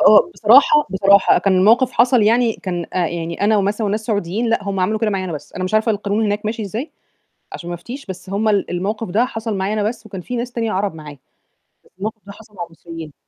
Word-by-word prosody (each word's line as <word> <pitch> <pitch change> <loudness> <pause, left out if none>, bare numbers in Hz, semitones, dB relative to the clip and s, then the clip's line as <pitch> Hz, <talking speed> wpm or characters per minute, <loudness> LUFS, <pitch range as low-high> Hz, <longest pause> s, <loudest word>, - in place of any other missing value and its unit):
آه، 210 +10 +6
بصراحة 275 +7 +5
بصراحة 195 +1 +4
كان 195 -2 +2
الموقِف 235 +7 +4
حصل 245 0 +4
يعني 230 +2 +3
كان 175 -5 -5
آآ 180 -2 +1
يعني 170 0 -5
أنا 210 +1 +3
ومثلًا 205 +2 0
وناس 215 +2 -2
سعوديين 210 +1 -1
لأ، 225 -3 0
هم 195 -1 -2
عملوا 215 +4 +1
كده 220 -1 0
معايا 195 -2 -2
أنا 175 - -4
بس، 150 - -8
أنا 185 - -4
مش 185 - -3
عارفة 215 +1 +3
القانون 205 +1 -1
هناك 210 0 -1
ماشي 220 +1 -3
إزاي 225 - -5 0.6
عشان 170 - -7
ما 175 - -3
أفتيش، 240 +11 -9
بس 190 0 -8
هم 210 +2 0
ال 205 -2 +1
الموقِف 200 +5 -3
ده 220 +7 +2
حصل 225 -4 -4
معانا 200 +3 -1
أنا 210 - +1
بس 230 -1 -7
وكان 195 -3 -7
في 245 +8 -5
ناس 240 +1 -4
تانية 230 -2 -2
عرب 195 -1 -1
معايا، 150 -3 -10 0.7
بس - - -25
الموقِف 220 +3 -5
ده 200 - -9
حصل 210 0 -16
مع 175 - -4
المصريين. 165 -2 -10
205 Hz, 235 wpm, -19 LUFS, 185-225 Hz, 0.7 s, آه